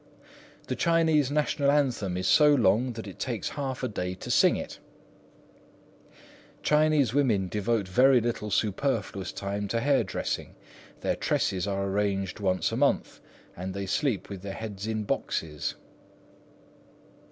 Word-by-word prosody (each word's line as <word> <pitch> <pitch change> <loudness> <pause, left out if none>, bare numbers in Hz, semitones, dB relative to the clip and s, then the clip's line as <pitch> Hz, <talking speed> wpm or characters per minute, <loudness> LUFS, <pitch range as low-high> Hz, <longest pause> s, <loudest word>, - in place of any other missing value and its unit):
"The - - -3
Chinese 160 -5 +3
National 145 -1 +1
Anthem 125 -11 +1
is 95 - -1
so 150 -1 +6
long 120 +1 +2
that 115 -1 -7
it 95 -5 -10
takes - - -2
half 135 -2 -4
a - - +1
day 90 -5 -4
to - - -6
sing - - +5
it." - - -6 1.8
"Chinese 150 -4 +3
women 115 -10 +2
devote 105 +1 -1
very 125 +7 +5
little 115 -2 -2
superfluous 105 -2 -1
time 100 +1 -4
to 115 +3 -1
hair 135 0 +2
dressing. 95 - -4 0.5
Their - - 0
tresses 95 0 0
are 100 -1 -1
arranged 100 -1 -1
once 95 -2 0
a - - -2
month, - - 0 0.3
and 95 +2 -5
they 100 0 -3
sleep 125 +2 -1
with 100 -3 -8
their 100 0 -6
heads 105 -2 -6
in 110 -1 -2
boxes." 75 -6 -2
105 Hz, 140 wpm, -27 LUFS, 95-135 Hz, 1.8 s, so